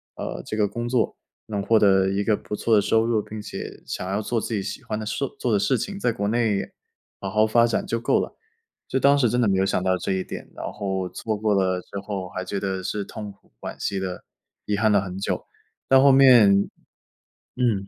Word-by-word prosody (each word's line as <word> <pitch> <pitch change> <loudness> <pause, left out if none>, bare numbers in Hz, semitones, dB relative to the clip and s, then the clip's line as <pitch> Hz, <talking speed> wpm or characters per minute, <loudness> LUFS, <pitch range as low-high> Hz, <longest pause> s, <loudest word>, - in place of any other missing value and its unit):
呃， - - -5
这 110 - -4
个 105 - +3
工 120 +4 -4
作。 125 -2 0 0.3
能 105 -2 -2
获 110 +3 +3
得 95 -2 +4
一 100 +1 0
个 110 - +2
不 105 - -6
错 115 +2 0
的 105 - +5
收 110 +2 +2
入， 115 -2 +1
并 110 +1 -8
且 105 - -7
想 90 - -4
要 100 +2 0
做 115 +1 -1
自 - - -5
己 100 - -2
喜 100 - -5
欢 110 - -3
的 110 - -5
事 115 - -2
做 120 - 0
的 105 - +3
事 130 +6 +2
情， 200 - -4
在 120 - +1
国 100 -2 -2
内 110 -3 +1 0.5
好 95 - -3
好 110 +3 +3
发 115 +2 +4
展 115 - -1
就 115 - -1
够 120 - +2
了。 - - -4 0.5
就 135 - 0
当 140 +1 +5
时 135 -5 +3
真 125 - 0
的 120 - +3
没 95 -1 +2
有 - - +3
想 95 -1 0
到 95 0 +2
这 95 +1 -2
一 95 - -1
点， - - -8
然 - - -6
后 95 -3 -2
错 110 +2 -3
过 105 0 +1
了 95 -2 +1
之 100 - -7
后 100 -2 -4
还 95 - -5
觉 95 +2 -3
得 95 -1 -2
是 100 +2 -3
痛 105 0 -7
苦 100 - -25
惋 - - -6
惜 100 -1 -2
地 95 -1 -5 0.4
遗 105 - 0
憾 110 +1 +2
了 100 - +5
很 95 0 -5
久， 100 - -2 0.4
到 135 0 +6
后 140 0 +7
面 130 -6 +7 1.1
嗯。 115 -6 0
105 Hz, 260 characters per minute, -24 LUFS, 95-115 Hz, 1.1 s, 后